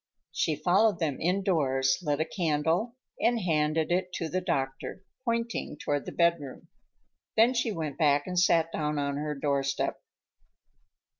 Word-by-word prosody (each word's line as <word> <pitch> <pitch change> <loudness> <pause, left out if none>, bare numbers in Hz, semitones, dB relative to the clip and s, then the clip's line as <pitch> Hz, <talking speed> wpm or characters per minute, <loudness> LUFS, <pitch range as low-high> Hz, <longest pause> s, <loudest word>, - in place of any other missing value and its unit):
She 155 - 0
followed 185 +8 +3
them 150 -5 -2
indoors, 155 -8 +1
lit 150 -4 -1
a 160 - +1
candle 165 +7 0 0.2
and 235 0 +2
handed 160 -3 +1
it 180 +1 0
to 165 -2 -3
the 185 +2 -1
doctor, 135 +2 -3 0.2
pointing 230 -8 -2
toward 145 -1 -2
the - - -4
bedroom. 170 -6 0 0.7
Then 230 +3 +5
she 235 -2 0
went 155 -6 -4
back 145 -2 +3
and 180 -1 0
sat 165 -2 +3
down 150 -1 -2
on 140 0 -1
her 150 0 -3
doorstep. 140 -1 -1
160 Hz, 145 wpm, -28 LUFS, 145-185 Hz, 0.7 s, Then